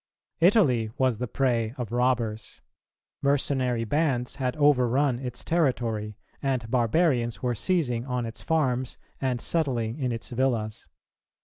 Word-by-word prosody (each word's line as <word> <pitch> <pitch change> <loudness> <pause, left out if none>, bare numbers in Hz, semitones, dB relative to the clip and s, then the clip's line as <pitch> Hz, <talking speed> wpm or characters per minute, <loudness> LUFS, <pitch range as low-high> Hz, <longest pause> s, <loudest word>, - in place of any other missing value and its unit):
Italy 160 - +4
was 130 -4 +1
the 125 - -2
prey 120 -3 0
of 120 -3 -4
robbers; 120 -3 -1 0.6
mercenary 130 -4 +1
bands 130 -1 0
had 130 -2 -1
overrun 135 -3 +3
its 125 -2 -5
territory, 115 - 0 0.2
and 130 -5 -1
barbarians 120 -1 +1
were 125 -1 +1
seizing 125 - 0
on 125 -2 -1
its 115 +1 -7
farms 130 -6 0 0.2
and 130 -2 -1
settling 125 -5 -1
in 130 -3 0
its 115 +1 -5
villas. 115 -4 -1
125 Hz, 125 wpm, -26 LUFS, 115-135 Hz, 0.6 s, Italy